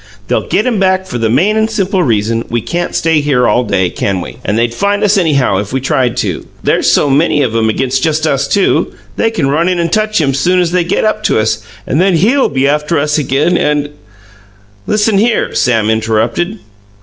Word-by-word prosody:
"They'll - - -1
get 210 - 0
him 240 -5 0
back 190 -1 +1
for 120 - -5
the 115 -1 0
main 175 - +2
and 220 0 +1
simple 195 -3 -1
reason 115 -4 0
we 120 - 0
can't 170 +11 -3
stay 160 -2 +2
here 135 -4 +1
all 125 - +2
day, 95 -5 0
can 95 -2 -2
we? - - -8
And 105 - -1
they'd 115 0 0
find 200 +9 0
us 210 0 +3
anyhow, 145 - +1
if 100 +1 -4
we 135 - -1
tried 130 -3 0
to. - - -4 0.2
There's - - +2
so - - +2
many 145 +1 +2
of 115 -3 -2
'em 110 -1 +1
against 130 +3 -1
just 155 +1 0
us 140 -2 0
two, 200 -2 +1 0.2
they 225 - +1
can 165 -12 -1
run 165 +5 +1
in 180 - 0
and 170 -1 -1
touch 215 -1 +1
him 140 -4 +1
soon 180 +7 +1
as 175 -2 0
they 180 -1 +1
get 175 +5 -1
up 215 0 0
to - - +2
us 110 0 0 0.3
and 150 - 0
then 190 -1 +2
HE'LL 235 - +2
be 135 -1 0
after 150 +3 0
us 150 +1 0
again 150 +5 +1
and 150 -1 0 0.5
" 100 0 -31
"Listen 210 -1 +1
here!" 230 +1 0
Sam 115 -4 +1
interrupted. 110 - -1
150 Hz, 220 wpm, -13 LUFS, 115-185 Hz, 0.5 s, us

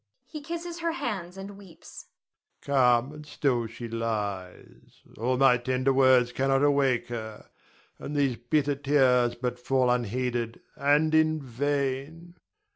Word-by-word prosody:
[He 305 -2 -9
kisses 340 +2 -6
her 335 -1 -1
hands 195 - -4
and 195 +1 -9
weeps.] 185 -5 -13 0.6
Calm 125 -2 +3
and 150 0 -10
still 130 -6 -1
she 115 +1 -8
lies, 105 -5 -5 0.2
all 125 +3 0
my 135 -2 +5
tender 130 +2 0
words 130 -2 +4
cannot 135 +2 +1
awake 140 -4 +2
her, 110 -2 -7 0.5
and 150 - -6
these 140 -4 +1
bitter 145 +4 0
tears 130 -4 +2
but 125 0 -4
fall 125 0 +1
unheeded 120 0 -2 0.2
and 145 +3 +2
in 155 0 +3
vain. 140 +5 -3
135 Hz, 130 wpm, -27 LUFS, 120-150 Hz, 0.6 s, my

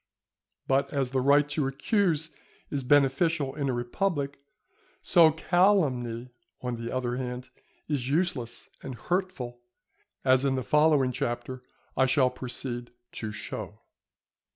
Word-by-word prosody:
But 135 +1 +2
as 135 -3 -1
the 130 -1 +1
right 145 +2 +5
to 145 -2 0
accuse 160 - +1 0.4
is 140 - -1
beneficial 145 +2 +3
in 140 -2 -2
a - - +1
republic, 140 +3 -2 0.6
so 170 -3 +6
calumny, 145 - +1 0.3
on 125 -1 -3
the 115 - -4
other 125 -1 -1
hand, 125 -1 -5 0.4
is 135 -4 -1
useless 140 -7 -1
and 130 -2 -6
hurtful, 160 -8 -3 0.6
as 130 0 +5
in 135 -1 +2
the 130 - -2
following 150 -3 +4
Chapter 120 +1 -3 0.3
I 130 0 +3
shall 130 -1 +3
proceed 125 -1 -5 0.2
to 110 -2 -5
show. 105 - -7
135 Hz, 130 wpm, -28 LUFS, 125-150 Hz, 0.6 s, so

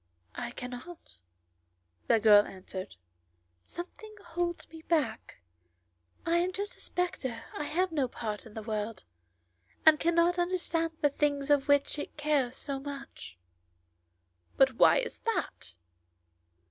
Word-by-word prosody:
"I 240 -1 -4
cannot," 250 - -9 0.9
the 225 - +5
girl 210 -1 +8
answered; 185 - -8 0.7
"something 425 - -9
holds 345 0 -2
me 320 0 -11
back. 290 - -1 0.8
I 335 +1 +3
am 360 +2 +1
just 405 +2 -4
a - - -22
spectator 260 -10 -3
and 295 - -3
have 360 +3 +1
no 285 -5 +1
part 220 -2 -5
in 210 - -15
the 220 - -5
world, 215 -1 -3 0.8
and 310 -1 +8
cannot 340 +1 +3
understand 340 -2 -1
the 290 -2 +4
things 285 -1 0
for 290 -1 +6
which 285 +1 +2
it - - -6
cares 290 -4 +1
so 275 -2 -3
much." 275 - -8 1.2
"But 265 -1 +5
why 245 - +6
is 485 - -6
that?" 420 - -3
290 Hz, 130 wpm, -30 LUFS, 235-340 Hz, 1.2 s, girl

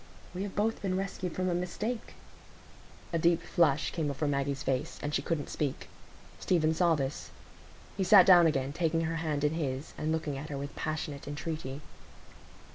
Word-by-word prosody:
We 185 - -4
have 200 -1 -4
both 220 +2 0
been 185 -2 -1
rescued 190 -2 -3
from 185 0 -1
a 180 - +1
mistake." 210 +7 -3 1.0
A 165 - +2
deep 170 +1 +4
flush 150 -4 +2
came 160 -4 -1
over 140 +2 -2
Maggie's 140 -1 -1
face, 130 -1 -1
and 145 0 -2
she 135 - +1
couldn't 150 0 -2
speak. 145 -3 -3 0.5
Stephen 160 -3 +2
saw 170 0 +3
this. 135 -1 -3 0.7
He 195 - +1
sat 190 0 +8
down 175 -3 +8
again, 135 -2 0
taking 165 0 +1
her 165 0 -1
hand 155 -3 -2
in 150 +1 +2
his, 140 -3 -3
and 155 +1 -1
looking 155 -4 -2
at 150 - -7
her 140 - -4
with 140 0 -6
passionate 150 -2 -4
entreaty. 145 -2 -5
160 Hz, 180 wpm, -30 LUFS, 145-175 Hz, 1.0 s, sat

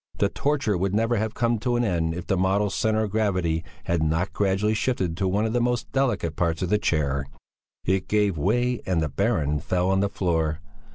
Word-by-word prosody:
The - - +2
torture 140 -10 0
would 95 +2 0
never 115 +2 +2
have 110 +1 -2
come 115 -2 +1
to 120 +2 0
an 120 - +1
end 85 -6 0
if 90 - -5
the 95 - +1
model's 95 +2 +1
centre 110 0 +1
of 105 - -3
gravity 90 -7 0 0.2
had 85 -1 0
not 80 +4 0
gradually 100 +2 +1
shifted 100 -7 -1
to 95 - 0
one 100 +4 +1
of 110 - -1
the 120 - +2
most 120 0 -1
delicate 125 - 0
parts 85 0 0
of 90 - -1
the 105 - +3
chair; 70 -6 0 0.6
it 95 0 0
gave 105 -3 +2
way 120 +9 +1
and 90 -3 +1
the 80 -2 0
Baron 75 +1 0
fell 90 +4 0
on 95 - +2
the 100 0 +1
floor. 80 -5 0
95 Hz, 215 wpm, -25 LUFS, 85-110 Hz, 0.6 s, the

